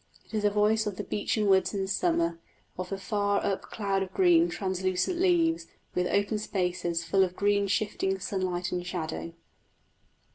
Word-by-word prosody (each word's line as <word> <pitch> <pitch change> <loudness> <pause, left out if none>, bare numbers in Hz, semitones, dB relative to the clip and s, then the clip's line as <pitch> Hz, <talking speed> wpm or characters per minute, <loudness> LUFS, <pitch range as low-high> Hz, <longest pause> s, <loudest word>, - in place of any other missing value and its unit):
It - - -21
is 215 -1 -1
a 205 - +5
voice 210 +1 +2
of 205 - -3
the - - -3
beechen 210 +1 -1
woods 195 +1 +3
in 195 -1 0
summer, 170 -3 +1 0.4
of 180 0 -5
the 195 - -3
far 205 +1 0
up 195 - 0
cloud 200 -2 -2
of 190 -1 -3
green, 350 -2 +4
translucent 190 - -1
leaves, 340 -3 +2 0.3
with 180 0 +1
open 205 +2 +1
spaces 180 -4 -1
full 190 +3 +2
of 180 -1 -2
green 200 0 +2
shifting 195 -1 0
sunlight 185 -3 -2
and 180 -1 -2
shadow. 155 - -4
195 Hz, 170 wpm, -28 LUFS, 180-210 Hz, 0.4 s, a